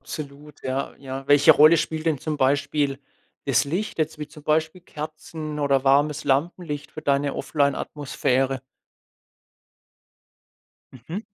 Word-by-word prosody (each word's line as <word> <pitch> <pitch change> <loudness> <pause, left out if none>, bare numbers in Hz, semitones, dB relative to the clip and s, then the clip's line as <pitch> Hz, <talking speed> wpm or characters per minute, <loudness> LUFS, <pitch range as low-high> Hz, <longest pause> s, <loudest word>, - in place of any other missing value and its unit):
absolut. 145 0 -9
Ja, 130 +1 -3
ja. 135 0 -6
Welche 145 0 +6
Rolle 155 +3 +7
spielt 160 +1 -2
denn 155 -4 +2
zum 155 +1 -3
Beispiel 140 0 +1 0.5
das 135 0 +3
Licht 180 +7 -3
jetzt 155 0 -1
wie 150 - -5
zum 150 -1 -14
Beispiel 160 +3 0
Kerzen 155 -1 -7
oder 140 -2 +2
warmes 145 +2 +3
Lampenlicht 150 +1 -1
für 155 - -8
deine 140 0 +1
offline 140 -2 +1
Atmosphäre? 135 -2 -1 2.3
Mhm. 145 - -7
145 Hz, 125 wpm, -24 LUFS, 140-155 Hz, 2.3 s, Rolle